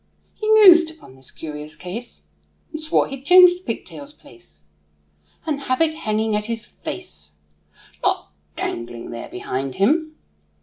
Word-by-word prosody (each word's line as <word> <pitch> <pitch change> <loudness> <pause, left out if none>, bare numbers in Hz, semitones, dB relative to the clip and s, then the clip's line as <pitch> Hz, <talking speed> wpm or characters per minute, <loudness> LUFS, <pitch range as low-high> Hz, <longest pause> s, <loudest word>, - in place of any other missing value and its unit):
He 430 0 -2
mused 360 -6 +8
upon 315 - -15
this 130 0 -12
curious 150 -1 -8
case, 215 +7 -8 0.5
And 310 - -6
swore 315 +2 +2
he'd 270 -1 -8
change 360 +3 +7
the - - -25
pigtail's 290 -5 -7
place, 75 - -19 0.8
And 290 -3 -2
have 255 - +1
it 325 -1 +2
hanging 220 -6 -1
at 210 0 -1
his 225 -1 -4
face, 75 - -9 0.7
Not - - 0 0.2
dangling 115 0 -5
there 115 0 -7
behind 130 +2 -4
him. 310 - +1
230 Hz, 140 wpm, -21 LUFS, -, 0.8 s, mused